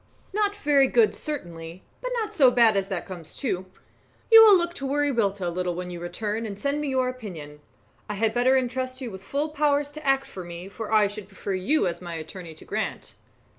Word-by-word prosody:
"Not 410 0 +1
very 285 -8 +3
good, 445 - +4
certainly; 175 - -6 0.2
but - - -3
not 435 - -3
so 270 -5 +6
bad 235 -3 +5
as 195 -1 0
that 190 -3 -4
comes 175 -4 -9
to. 190 -9 -2 0.6
You 450 0 +11
will 425 -3 +9
look 345 0 -1
to 275 - -6
Wiriwilta 240 -9 0
a - - 0
little 180 0 -2
when 180 0 -5
you 175 - -6
return, 210 +6 -3
and 200 -2 -6
send 280 +7 -1
me 300 - -2
your 260 -2 +1
opinion. 175 -13 -7 0.5
I 210 - -2
had 220 +2 +1
better 250 +2 +4
entrust 255 0 -2
you 250 -4 -5
with 190 -1 -9
full 285 +9 -2
powers 290 -1 +1
to 305 +1 -9
act 270 0 +2
for 190 -8 -8
me, 175 +2 -8
for 210 +3 -7
I 215 -1 +5
should 205 -1 -5
prefer 195 0 -5
you 195 +11 +1
as 175 -1 -3
my 170 -2 -6
attorney 165 +1 -8
to - - -14
Grant." - - -4
225 Hz, 215 wpm, -25 LUFS, 185-280 Hz, 0.6 s, You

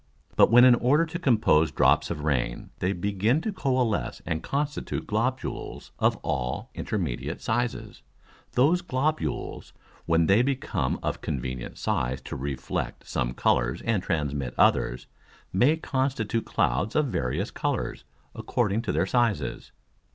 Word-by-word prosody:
But - - +6
when 120 +3 +8
in 125 - +8
order 135 +7 +3
to 170 +1 -5
compose 110 - +3
drops - - +3
of 75 -3 -4
Rain 65 -5 -1
they 90 - +1
begin 100 - +1
to 215 +3 -3
coalesce 130 - 0
and 80 -1 -2
constitute 145 +1 -3
Globules 125 +5 -3
of - - +3
all 60 0 -2
intermediate 75 - -3
sizes, 120 +1 -2 0.5
those 155 +8 +3
Globules, 155 -1 -2 0.3
when 85 0 +3
they 100 +7 +5
become 135 +1 -1
of - - -2
convenient 65 -2 -4
size 65 0 -1
to - - -7
reflect 70 -1 -4
some - - -2
Colours - - +1
and 115 -5 +1
transmit 70 -7 -2
others, 65 +1 +2 0.5
may 130 - +4
constitute 130 -7 -1
Clouds 65 - 0
of 150 - +3
various 65 - -2
Colours - - -2 0.3
according 115 -3 0
to - - -2
their - - +1
sizes. 115 - 0
105 Hz, 135 wpm, -26 LUFS, -, 0.5 s, when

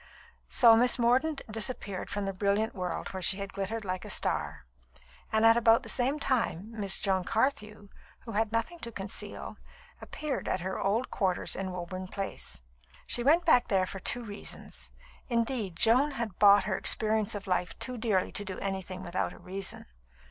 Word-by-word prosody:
So 230 -3 +7
Miss 245 +3 +3
Mordaunt 260 +5 +2
disappeared 215 -3 -3
from 205 -1 -2
the 195 - -2
brilliant 200 +3 0
world 180 -2 -4
where 190 - -6
she 190 +2 +3
had 200 -1 -6
glittered 205 +3 -3
like 185 -1 -3
a - - -8
star; - - -1 0.7
and 220 +1 +3
at 225 0 +7
about 230 -1 +4
the - - -5
same 265 +4 +1
time, 230 - -1
Miss 205 -4 +3
Joan 190 -2 +1
Carthew 215 -2 -1 0.3
(who 230 - -9
had 220 0 0
nothing 230 +10 -2
to 235 - -5
conceal) 195 -2 -5 0.4
appeared 300 -3 -4
at 185 - -1
her 190 +1 -3
old 220 +6 0
quarters 185 -3 0
in 190 0 -3
Woburn 185 +1 -6
Place. 195 - -5 0.4
She 240 - 0
went 320 +6 +4
back 280 -7 +5
there 190 -2 +2
for 195 - -7
two 245 +5 0
reasons; 205 -2 -7 0.4
indeed, 230 -5 -1
Joan 250 - +4
had 230 -8 -5
bought 205 -1 +7
her 190 -1 -2
experience 215 -1 +2
of 205 0 -6
life 180 -2 -1
too 255 - -3
dearly 215 -5 0
to 205 - -3
do 190 -2 -6
anything 190 -1 -4
without 175 +2 -2
a - - -14
reason. 190 +1 -4
210 Hz, 175 wpm, -29 LUFS, 190-235 Hz, 0.7 s, So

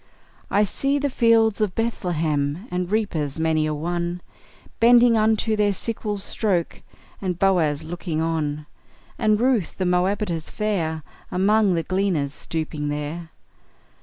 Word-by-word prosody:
I 205 - +3
see 275 +7 0
the 285 -1 -1
fields 225 -3 +3
of 205 -3 0
Bethlehem, 165 -7 -1
And 180 0 -2
reapers 160 -10 -1
many 160 -1 +1
a 155 - -1
one 175 +3 -3 0.6
Bending 235 0 +6
unto 220 0 +2
their 205 -1 +2
sickles' 210 -1 -3
stroke, 190 -7 -1 0.4
And 185 -3 -2
Boaz 165 -6 +2
looking 165 0 -4
on; 155 -2 -1 0.5
And 215 -1 +3
Ruth, 240 -8 +1
the 185 - -1
Moabitess 180 -1 0
fair, 170 -8 -2 0.3
Among 200 +1 +3
the 165 - 0
gleaners 185 -7 0
stooping 155 -2 -4
there! 150 +3 -4
180 Hz, 130 wpm, -23 LUFS, 160-215 Hz, 0.6 s, Bending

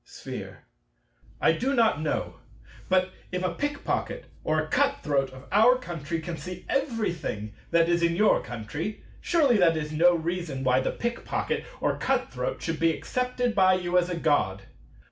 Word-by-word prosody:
Sphere. - - -8 0.8
I - - +4
do 270 +3 0
not 225 - +3
know. 155 - -2 0.5
But, 185 0 +3 0.2
if 180 0 -2
a 180 -2 0
pick 290 +4 -3
pocket - - -2 0.2
or 155 0 +1
a 155 - -2
cut 280 - +1
throat 140 -3 +1
of 130 0 -12
our 230 +5 +6
country 170 - -4
can 165 +1 -5
see 180 +4 -8
everything 205 - -2 0.2
that 165 0 +4
is 170 0 +2
in 170 0 +2
your 210 +4 +4
country, 125 - -5 0.2
surely 290 -9 +3
that 165 -4 +4
is 150 -1 -3
no 175 +3 +5
reason 165 -4 -3
why 130 0 +3
the 130 - 0
pick 235 0 -3
pocket - - -2
or - - 0
cut - - 0
throat - - -3
should 165 -1 -2
be 165 0 +4
accepted 250 +6 -1
by 185 -2 +5
you 180 -1 -2
as 180 0 +3
a 175 - -2
God. 120 - +1
175 Hz, 180 wpm, -27 LUFS, 155-225 Hz, 0.8 s, our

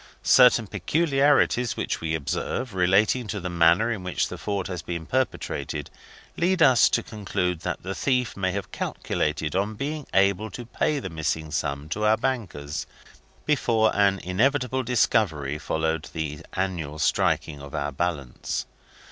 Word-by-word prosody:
Certain 125 -3 +6
peculiarities 135 - +2
which - - -2
we 80 -1 -1
observe, 105 - -3
relating 100 +6 +3
to 105 0 -3
the 90 0 -4
manner 85 +7 +4
in 100 -5 -4
which 90 -1 -1
the - - -6
fraud 100 -2 -2
has 90 -3 -4
been 85 0 -5
perpetrated, 75 - -2 0.5
lead 175 0 +3
us 130 -4 +6
to - - +1
conclude 95 -5 -2
that - - -4
the 95 +2 -3
thief 125 +2 0
may 95 -1 0
have 100 +1 -5
calculated 75 0 -2
on 100 +3 0
being 145 +4 -4
able 100 +2 +2
to 120 - -8
pay 150 +5 0
the 95 -10 -5
missing 80 -1 -2
sum 70 +1 -2
to 105 +7 -3
our 110 +1 +4
bankers, 95 - -3 0.6
before 115 -7 +2
an 100 -1 +3
inevitable 125 +7 +1
discovery 95 - +1
followed 80 0 -2
the 75 -2 -3
annual 85 -6 -2
striking 75 0 +1
of 70 -1 -8
our 70 0 -2
balance. 70 -4 -3
95 Hz, 150 wpm, -25 LUFS, 80-120 Hz, 0.6 s, Certain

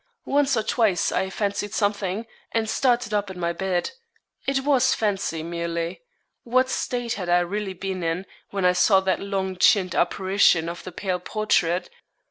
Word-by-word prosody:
Once 280 -2 +2
or 220 - +1
twice 215 -6 +1
I 190 +1 0
fancied 205 +1 -2
something, 205 0 -1 0.3
and 225 -1 0
started 240 -1 +1
up 205 -1 0
in 185 -1 -8
my 170 0 0
bed. 180 0 -1 0.6
It 270 -1 +1
was 265 -2 +3
fancy, 195 -7 -1
merely. 170 - -3 0.4
What 255 +2 +2
state 245 -2 -2
had 180 -3 -4
I 175 0 +4
really 195 +2 -3
been 190 0 -4
in, 165 +3 -2 0.2
when 195 -2 -1
I 180 - +5
saw 190 +2 +4
that 190 -1 0
long 190 -2 -3
chinned 185 0 +4
apparition 185 -2 +3
of 170 - -7
the 185 - -7
pale 185 0 -2
portrait? 180 -3 0
195 Hz, 165 wpm, -24 LUFS, 180-220 Hz, 0.6 s, I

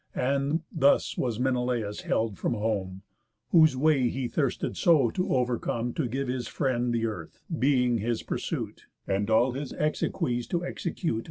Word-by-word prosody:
And 140 +5 0
thus 140 -2 +3
was 120 -3 -1
Menelaus 125 -5 0
held 110 -5 -1
from - - 0
home, 100 -3 -2 0.5
Whose 155 -5 +5
way 135 -3 +3
he 130 0 -2
thirsted 135 +2 -1
so 150 -9 +4
to 185 - -2
overcome, 120 -1 0
To 150 - -1
give 135 +3 -2
his 125 -2 -2
friend 125 -3 0
the 115 -1 0
earth, 95 -8 -6 0.2
being 125 -3 +3
his 115 +2 -1
pursuit, - - -4 0.2
And 100 +2 0
all 115 +4 +4
his 135 +2 -5
exequies 125 -5 -1
to 175 0 -1
execute. 170 - -2
125 Hz, 155 wpm, -28 LUFS, 115-140 Hz, 0.5 s, Whose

